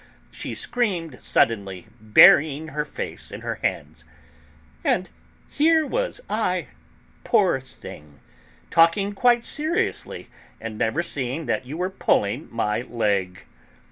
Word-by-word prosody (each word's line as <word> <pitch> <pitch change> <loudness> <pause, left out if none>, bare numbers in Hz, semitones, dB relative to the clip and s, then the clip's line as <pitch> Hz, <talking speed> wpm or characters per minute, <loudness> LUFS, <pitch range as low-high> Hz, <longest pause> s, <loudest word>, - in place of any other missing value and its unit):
she - - -6
screamed, 185 - -2
suddenly, 100 -5 0
burying 145 +8 +6
her 150 +1 -2
face - - -6
in - - -8
her - - -4
hands. 80 +2 -3 0.8
"And 185 +1 0 0.4
here 315 +1 +3
was - - -2
I, - - -1 0.5
poor 200 - +2
thing, 75 - -13 0.5
talking 170 +5 +3
quite 240 +3 +3
seriously, 315 +4 -2 0.3
and 115 -1 -6
never 140 +10 0
seeing 145 -1 -2
that 120 +1 -2
you 150 +4 -6
were 180 +2 -2
pulling 120 - 0
my 115 -1 -1
leg." 100 -7 -2
150 Hz, 115 wpm, -23 LUFS, -, 0.8 s, burying